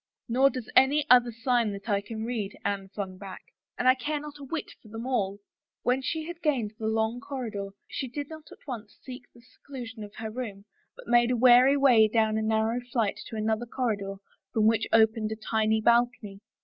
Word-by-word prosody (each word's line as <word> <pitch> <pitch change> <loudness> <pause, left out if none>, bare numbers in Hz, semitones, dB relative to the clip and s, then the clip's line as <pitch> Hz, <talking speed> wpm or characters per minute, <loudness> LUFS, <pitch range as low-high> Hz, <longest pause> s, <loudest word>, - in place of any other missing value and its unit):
" - - -65
Nor 260 +3 +4
does 255 -4 -6
any 285 +3 +5
other 245 -1 +6
sign 230 -1 +1
that 200 +2 -9
I 200 -2 +1
can 220 +1 -6
read," 220 -4 -4
Anne 200 -1 -2
flung 190 -2 -6
back. 195 -2 -9 0.2
" - - -63
And 250 - 0
I 255 - +8
care 290 +4 -3
not 295 0 -9
a - - -9
whit 305 +3 -5
for - - -17
them 225 +2 -7
all! 200 -7 -1 0.2
" - - -66
When 250 +2 +1
she 315 +3 -3
had 345 +1 -8
gained 250 -9 0
the 220 - -2
long 220 +2 0
corridor, 245 -8 -5 0.2
she 265 - -4
did 285 +3 -5
not 315 -1 -11
seek - - -12
at - - -21
once 225 -5 -7
the 255 0 -8 0.2
seclusion 250 -3 -9
of 205 0 -11
her 220 -1 -5
room, 210 -4 -6 0.3
but - - -13
made 240 0 +4
a 250 - +1
wary 255 +3 +6
way 245 -6 +6
down 220 0 +1
a - - -1
narrow 220 +2 0
flight 225 -5 0
to - - -8
another 220 +2 -1
corridor 210 -6 -2 0.4
from 220 -1 +2
which 220 0 +3
opened 220 -1 +3
a - - -5
tiny 220 0 0
balcony. 235 -3 +1
230 Hz, 215 wpm, -27 LUFS, 215-255 Hz, 0.4 s, I